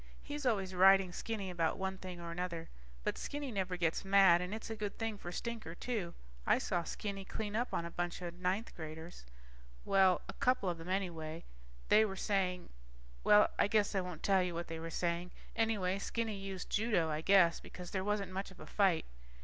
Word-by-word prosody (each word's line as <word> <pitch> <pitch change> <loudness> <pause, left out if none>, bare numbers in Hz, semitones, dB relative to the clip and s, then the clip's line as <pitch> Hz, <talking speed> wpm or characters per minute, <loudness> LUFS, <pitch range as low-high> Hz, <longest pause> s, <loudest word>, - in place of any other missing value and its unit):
He's 290 -2 -3
always 195 -5 0
riding 190 0 +6
Skinny 200 -1 -4
about 165 -2 0
one 190 0 -3
thing 180 -2 -7
or 170 -1 -6
another, 170 -1 -4 0.3
but - - -1
Skinny 285 -2 -4
never 185 -3 -1
gets 170 -2 0
mad 195 -3 +6
and 180 +1 -4
it's 220 +1 -5
a - - -2
good 210 -2 -4
thing 225 -1 -2
for 175 - -6
Stinker, 225 -5 -5
too. 205 -6 -3 0.3
I - - +4
saw 175 - 0
Skinny 195 +3 -4
clean 205 +1 -4
up 240 +3 0
on 170 - -1
a 170 - -6
bunch 175 0 -3
of 170 -1 -4
ninth 185 +5 -2
graders... 160 - -8 0.6
Well, 190 -2 +4
a - - -6
couple 250 -7 +2
of 170 -1 -3
them 165 +2 -8
anyway. 170 -4 -2 0.5
They 215 - +7
were 200 -3 -2
saying... 185 -2 0 0.5
Well, 210 0 +6
I - - +5
guess 210 0 +2
I 195 - +1
won't 180 -3 -7
tell 195 -2 +4
you 180 -2 -2
what 170 +1 -4
they 165 0 -4
were 165 +1 -5
saying. 175 +1 -1 0.3
Anyway, 200 -4 +1
Skinny 225 +1 -2
used 195 -2 -6
judo, 205 -7 +2
I 155 +1 -1
guess, 180 -2 +5
because 180 -1 -9
there 190 -1 -1
wasn't 205 -2 -1
much 190 +1 -3
of 190 - -15
a - - -9
fight. 190 -6 +2
190 Hz, 205 wpm, -35 LUFS, 175-205 Hz, 0.6 s, They